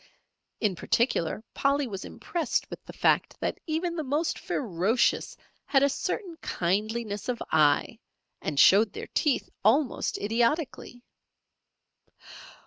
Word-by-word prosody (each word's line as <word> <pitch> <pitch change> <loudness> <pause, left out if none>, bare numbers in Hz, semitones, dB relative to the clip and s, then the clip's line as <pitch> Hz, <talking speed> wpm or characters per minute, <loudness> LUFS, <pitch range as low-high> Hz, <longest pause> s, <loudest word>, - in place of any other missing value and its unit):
In 205 -4 +1
particular, 215 -1 0
Polly 280 +1 +1
was 195 -6 -6
impressed 340 -3 -2
with - - -8
the - - -9
fact - - +1
that - - -2
even 335 +2 -1
the 315 - -2
most 300 +4 -1
ferocious 215 0 0 0.3
had 275 -1 +4
a 280 - +4
certain 345 - -3
kindliness 210 +4 -2
of 245 - -1
eye, 150 -2 +3 0.4
and 145 -2 -2
showed 205 +2 +6
their - - -7
teeth 290 -4 +1 0.2
almost 250 +6 +2
idiotically. 240 +3 -1
235 Hz, 120 wpm, -27 LUFS, 205-290 Hz, 0.4 s, showed